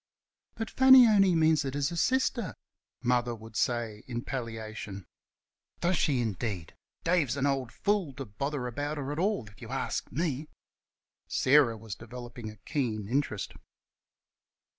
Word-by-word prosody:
"But 225 Hz, -1 st, -4 dB
Fanny 265 Hz, -1 st, +9 dB
only 195 Hz, -4 st, +5 dB
means 160 Hz, -2 st, +4 dB
it 135 Hz, 0 st, -3 dB
as 145 Hz, +2 st, 0 dB
a -, -, -4 dB
sister," 240 Hz, +2 st, +1 dB, 0.5 s
Mother 120 Hz, -1 st, +1 dB
would 110 Hz, 0 st, -12 dB
answer 115 Hz, -1 st, -1 dB
in 120 Hz, -1 st, -4 dB
palliation. 110 Hz, -6 st, -5 dB, 0.7 s
"Does 180 Hz, +2 st, +2 dB
she 140 Hz, -6 st, +2 dB
indeed!... 100 Hz, -5 st, -3 dB, 0.3 s
Dave's 165 Hz, -7 st, +2 dB
an 140 Hz, -, +1 dB
old 135 Hz, -3 st, 0 dB
fool 200 Hz, -6 st, 0 dB
to 135 Hz, +1 st, -6 dB
bother 130 Hz, +6 st, -3 dB
about 145 Hz, +5 st, -3 dB
her 140 Hz, -1 st, -3 dB
at 150 Hz, -, -3 dB
all, 200 Hz, -, +1 dB
if 105 Hz, +5 st, -16 dB
y' 115 Hz, -, -7 dB
arsk 135 Hz, +3 st, -3 dB
me!" 150 Hz, -2 st, -1 dB, 0.8 s
Sarah 130 Hz, -4 st, +4 dB
was 110 Hz, -1 st, -7 dB
developing 120 Hz, 0 st, -8 dB
a 105 Hz, -, -10 dB
keen 110 Hz, -4 st, -2 dB
interest. 120 Hz, -4 st, -1 dB
130 Hz, 145 wpm, -30 LUFS, 115-155 Hz, 0.8 s, Fanny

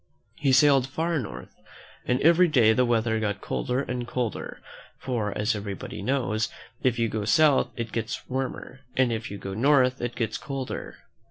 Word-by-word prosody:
He 140 Hz, -2 st, +2 dB
sailed 135 Hz, -1 st, +5 dB
far 160 Hz, +3 st, -1 dB
north, 65 Hz, -, -8 dB, 0.5 s
and 125 Hz, +1 st, +2 dB
every 170 Hz, +3 st, +6 dB
day 120 Hz, -8 st, +5 dB
the 125 Hz, +3 st, +3 dB
weather 110 Hz, -1 st, +1 dB
got 105 Hz, -2 st, -2 dB
colder 125 Hz, +5 st, -2 dB
and 125 Hz, -2 st, -4 dB
colder; 120 Hz, -3 st, -3 dB, 0.4 s
for, 115 Hz, -5 st, -2 dB
as 105 Hz, +2 st, +1 dB
everybody 105 Hz, +5 st, -6 dB
knows, 115 Hz, -5 st, 0 dB, 0.3 s
if 125 Hz, -3 st, +1 dB
you 115 Hz, -1 st, +2 dB
go 110 Hz, -1 st, -3 dB
south 145 Hz, +6 st, +4 dB
it 115 Hz, -2 st, -4 dB
gets 115 Hz, 0 st, -4 dB
warmer, 130 Hz, 0 st, -4 dB, 0.2 s
and 130 Hz, -3 st, +3 dB
if 115 Hz, 0 st, -4 dB
you 100 Hz, -, -6 dB
go 95 Hz, -1 st, -6 dB
north 130 Hz, +2 st, +3 dB
it 120 Hz, 0 st, -3 dB
gets 115 Hz, -3 st, -2 dB
colder. 135 Hz, -2 st, -5 dB
125 Hz, 170 wpm, -26 LUFS, 110-135 Hz, 0.5 s, every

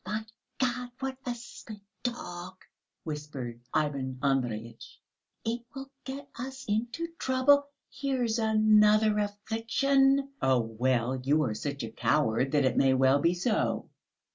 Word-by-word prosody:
"Oh, 185 Hz, -, -9 dB
my 215 Hz, +1 st, -2 dB, 0.3 s
God, 250 Hz, -1 st, -1 dB
what 265 Hz, -1 st, -3 dB
a 245 Hz, -, -1 dB
stupid 230 Hz, -2 st, -10 dB, 0.2 s
dog!" 180 Hz, -8 st, -5 dB, 0.5 s
whispered 145 Hz, -6 st, -6 dB
Ivan 140 Hz, -4 st, -1 dB
Andreyitch; 120 Hz, -4 st, -2 dB, 0.5 s
"it 230 Hz, +2 st, -1 dB
will 270 Hz, 0 st, -7 dB
get 275 Hz, +2 st, -6 dB
us 265 Hz, +2 st, -6 dB
all 205 Hz, -, +1 dB
into 240 Hz, +10 st, -3 dB
trouble. 280 Hz, +2 st, +4 dB, 0.2 s
Here's 250 Hz, -3 st, -1 dB
another 215 Hz, -1 st, +4 dB
affliction!" 270 Hz, +7 st, +1 dB
"Oh, 130 Hz, -2 st, +3 dB
well, 120 Hz, +2 st, 0 dB
you 150 Hz, +3 st, +3 dB
are 115 Hz, -6 st, -1 dB
such 140 Hz, +4 st, -4 dB
a 110 Hz, -, -5 dB
coward, 135 Hz, -1 st, +1 dB
that 145 Hz, -2 st, +4 dB
it 130 Hz, -, +1 dB
may 135 Hz, -1 st, +4 dB
well 135 Hz, +2 st, +4 dB
be 170 Hz, +4 st, +2 dB
so." 215 Hz, +5 st, 0 dB
210 Hz, 140 wpm, -29 LUFS, -, 0.5 s, trouble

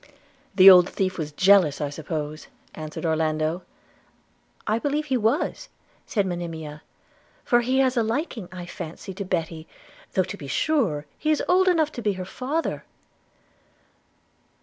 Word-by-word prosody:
'The 190 Hz, 0 st, +7 dB
old 180 Hz, -2 st, +9 dB
thief 185 Hz, -2 st, -2 dB
was 150 Hz, -1 st, -3 dB
jealous, 185 Hz, -2 st, +4 dB
I 145 Hz, -2 st, -2 dB
suppose,' 155 Hz, 0 st, -5 dB, 0.3 s
answered 155 Hz, +2 st, -6 dB
Orlando. 160 Hz, +1 st, 0 dB, 1.0 s
'I 215 Hz, +2 st, +1 dB
believe 295 Hz, +3 st, -1 dB
he 265 Hz, -, 0 dB
was,' 240 Hz, +6 st, 0 dB, 0.4 s
said 205 Hz, -4 st, 0 dB
Monimia; 165 Hz, -4 st, -5 dB, 0.6 s
'for 240 Hz, 0 st, +3 dB
he 255 Hz, +2 st, 0 dB
has 260 Hz, -1 st, +2 dB
a 235 Hz, -, +3 dB
liking, 225 Hz, -, -3 dB
I 180 Hz, -1 st, -7 dB
fancy, 175 Hz, +2 st, -8 dB
to 200 Hz, -, -5 dB
Betty, 165 Hz, -3 st, -3 dB, 0.5 s
though 185 Hz, -, +3 dB
to 185 Hz, +3 st, -7 dB
be 140 Hz, -, -9 dB
sure 180 Hz, -, 0 dB
he 310 Hz, -, -1 dB
is 310 Hz, -, +2 dB
old 370 Hz, +1 st, +4 dB
enough 320 Hz, -4 st, +3 dB
to 240 Hz, -, -7 dB
be 210 Hz, -2 st, +1 dB
her 185 Hz, -1 st, -6 dB
father.' 270 Hz, -, -3 dB
185 Hz, 150 wpm, -24 LUFS, 160-245 Hz, 1.0 s, old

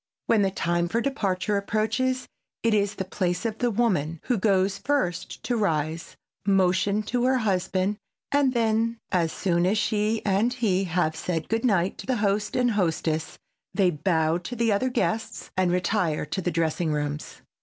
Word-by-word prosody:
When 225 Hz, -2 st, +3 dB
the 195 Hz, -, +3 dB
time 175 Hz, -2 st, 0 dB
for 225 Hz, +7 st, 0 dB
departure 210 Hz, -6 st, 0 dB
approaches 220 Hz, +6 st, 0 dB, 0.4 s
it 230 Hz, -1 st, +3 dB
is 205 Hz, -1 st, +1 dB
the 190 Hz, -, -3 dB
place 180 Hz, 0 st, -2 dB
of 220 Hz, -1 st, -2 dB
the 245 Hz, -, +2 dB
woman 185 Hz, -9 st, 0 dB
who 245 Hz, -5 st, 0 dB
goes 190 Hz, -1 st, +2 dB
first 185 Hz, -12 st, -1 dB
to 245 Hz, -, 0 dB
rise, 160 Hz, -6 st, -1 dB, 0.3 s
motion 195 Hz, +1 st, +2 dB
to 245 Hz, +3 st, 0 dB
her 260 Hz, 0 st, +3 dB
husband, 190 Hz, -2 st, 0 dB, 0.3 s
and 285 Hz, -2 st, +3 dB
then 230 Hz, 0 st, +1 dB
as 170 Hz, -3 st, +1 dB
soon 175 Hz, -3 st, 0 dB
as 205 Hz, +4 st, +2 dB
she 215 Hz, +1 st, 0 dB
and 205 Hz, +5 st, +2 dB
he 200 Hz, -6 st, +1 dB
have 165 Hz, -2 st, 0 dB
said 165 Hz, -1 st, -3 dB
good 225 Hz, 0 st, 0 dB
night 195 Hz, -7 st, +1 dB
to -, -, -8 dB
the 260 Hz, -, +1 dB
host 205 Hz, -1 st, 0 dB
and 250 Hz, -1 st, +2 dB
hostess, 160 Hz, -5 st, -1 dB, 0.4 s
they 190 Hz, -2 st, +3 dB
bow 160 Hz, 0 st, +1 dB
to 210 Hz, +8 st, -6 dB
the 230 Hz, -1 st, +1 dB
other 205 Hz, +6 st, +1 dB
guests, 225 Hz, -2 st, -2 dB
and 185 Hz, -2 st, +2 dB
retire 180 Hz, -3 st, 0 dB
to 190 Hz, -, -3 dB
the 180 Hz, -, -1 dB
dressing 165 Hz, 0 st, 0 dB
rooms. 150 Hz, 0 st, -4 dB
195 Hz, 175 wpm, -26 LUFS, 175-225 Hz, 0.4 s, When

